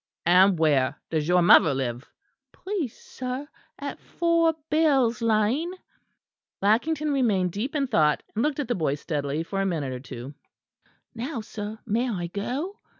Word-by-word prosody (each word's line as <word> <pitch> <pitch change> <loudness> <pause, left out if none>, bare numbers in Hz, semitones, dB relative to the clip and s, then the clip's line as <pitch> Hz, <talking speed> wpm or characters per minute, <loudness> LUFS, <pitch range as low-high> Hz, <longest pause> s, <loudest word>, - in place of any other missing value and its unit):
"And 185 +2 +5
where 145 -4 +2
does 155 -2 0
your 180 0 +4
mother 155 -4 +6
live?" 125 -1 -3 0.4
"Please, 370 - -4
sir, 255 +3 -6 0.3
at - - -6
4 335 -1 +1 0.2
Bell's 270 -8 +3
Lane." 230 - +1 0.8
Lackington 295 +9 +1
remained 210 -10 +1
deep 225 - -4
in 280 -2 +1
thought, 155 - +2
and 220 - -1
looked 295 +2 0
at 285 - -2
the 245 - +1
boy 155 -7 0
steadily 145 0 -3
for 195 +3 -3
a - - 0
minute 150 -8 -2
or 125 - -5
two. 130 +1 -8 0.8
"Now, 245 +2 -4
sir; 215 0 -6
may 235 +3 0
I 180 -6 -2
go?" 255 - -4
215 Hz, 150 wpm, -26 LUFS, -, 0.8 s, mother